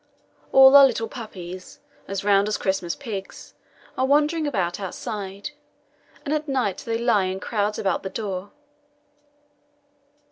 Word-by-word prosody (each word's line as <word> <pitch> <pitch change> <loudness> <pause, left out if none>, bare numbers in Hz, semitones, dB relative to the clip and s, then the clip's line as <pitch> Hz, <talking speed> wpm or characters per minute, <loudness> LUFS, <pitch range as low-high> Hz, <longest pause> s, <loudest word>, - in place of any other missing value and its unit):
All 265 +1 +8
our 280 -1 +10
little 225 -3 -2
puppies 185 -7 -9 0.3
as 195 +1 -4
round 200 0 +3
as 210 - -1
Christmas 190 -3 -1
pigs 210 -8 -7 0.4
are 260 - +1
wandering 300 +2 +2
about 185 -10 -1
outside, 200 +4 -6 0.7
and 290 - -1
at 305 0 -2
night 255 -8 -1
they 230 -1 -2
lie 230 -5 +2
in 185 +1 -3
crowds 210 0 -1
about 190 -3 0
the 190 - -5
door. 195 -2 -5
210 Hz, 135 wpm, -24 LUFS, 190-265 Hz, 0.7 s, our